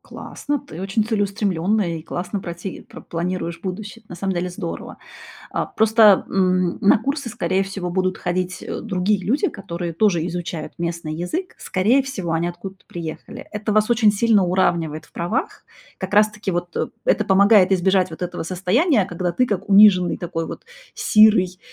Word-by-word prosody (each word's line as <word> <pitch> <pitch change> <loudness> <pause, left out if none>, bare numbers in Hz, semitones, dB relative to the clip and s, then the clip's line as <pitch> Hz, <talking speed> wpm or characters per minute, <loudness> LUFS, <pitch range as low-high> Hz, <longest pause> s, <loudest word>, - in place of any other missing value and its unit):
Классно, 290 0 -5
ты 170 -7 -10
очень 195 +3 0
целеустремлённая 200 -4 0
и - - -10
классно 185 +4 -4
прати 175 +2 -7
пр - - -11
планируешь 170 0 -4
будущее. 210 +4 -7
На 175 - -8
самом 190 +2 -2
деле 180 +1 -2
здорово. 175 -1 -6 0.6
Э, - - 0
просто, 220 -2 +5
м, 185 -2 +1
на 205 - +5
курсы, 275 0 -3
скорее 185 +2 0
всего, 195 -2 -5
будут 185 +1 -1
ходить, 185 +1 -3
э, - - -5
другие 190 -2 0
люди, 275 - +1
которые 175 -3 -6
тоже 175 -5 +2
изучают 170 -3 -5
местный 170 -2 -3
язык. 315 - -4
Скорее 225 +9 +2
всего, 195 -11 -4
они 165 +1 0
откуда-то 190 +2 -9
приехали. 165 -2 -8
Это 210 0 -3
вас 215 +1 +3
очень 220 -3 +4
сильно 210 -2 +3
уравнивает 165 -4 0
в - - -28
правах. 210 +10 -3 0.3
Как 190 0 -5
раз 210 +1 +5
таки 210 -2 -5
вот 175 0 -4 0.3
это - - +2
помогает 195 0 +5
избежать 185 -1 +2
вот 160 - -10
этого 180 -2 -4
состояния, 195 - +1
когда 175 0 -3
ты 250 +7 +2
как 205 -1 -3
униженный, 195 -3 +6
такой 165 -2 -3
вот - - -8 0.3
сирый 210 -4 +4
185 Hz, 165 wpm, -21 LUFS, 175-210 Hz, 0.6 s, униженный